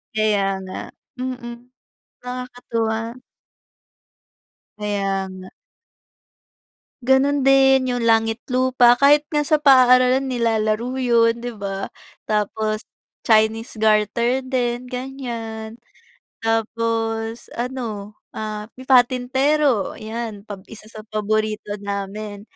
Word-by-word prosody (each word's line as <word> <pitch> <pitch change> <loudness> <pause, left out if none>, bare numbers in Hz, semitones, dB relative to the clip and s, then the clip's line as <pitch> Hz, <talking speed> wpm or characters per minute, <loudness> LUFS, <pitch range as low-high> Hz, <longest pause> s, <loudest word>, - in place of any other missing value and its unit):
Kaya 215 -2 +2 0.2
nga. 185 0 -8 0.5
Mm. 245 -1 -6 0.6
Nakakatuwa. 245 -3 -3 1.8
Kaya 195 -2 -1
nga. 185 0 -10 1.6
Ganun 270 +1 +3
din, 270 -1 +5
yung 245 - -2
langit 225 +1 +2
lupa, 255 -1 +4
kahit 290 +2 +4
nga 295 -1 0
sa 305 0 +2
paaralan 255 -1 +5
nilalaro 230 0 0
yun, 235 -2 +3
'di 240 0 -6
ba? 195 -2 -5 0.3
Tapos 215 +1 -1 0.4
chinese 220 0 +2
garter 220 +4 +2
din, 250 -1 -2
ganiyan. 235 -4 -6 0.6
Tapos 225 0 -1
ano, 230 -5 -5 0.2
ah, 215 -1 -5 0.2
patintero, 255 0 +3
'yan 220 -1 -5
pa 205 - -5
isa 215 -1 -13
sa 215 -1 -11
paborito 215 -1 -2
namin. 200 +1 -5
230 Hz, 90 wpm, -21 LUFS, 215-255 Hz, 1.8 s, din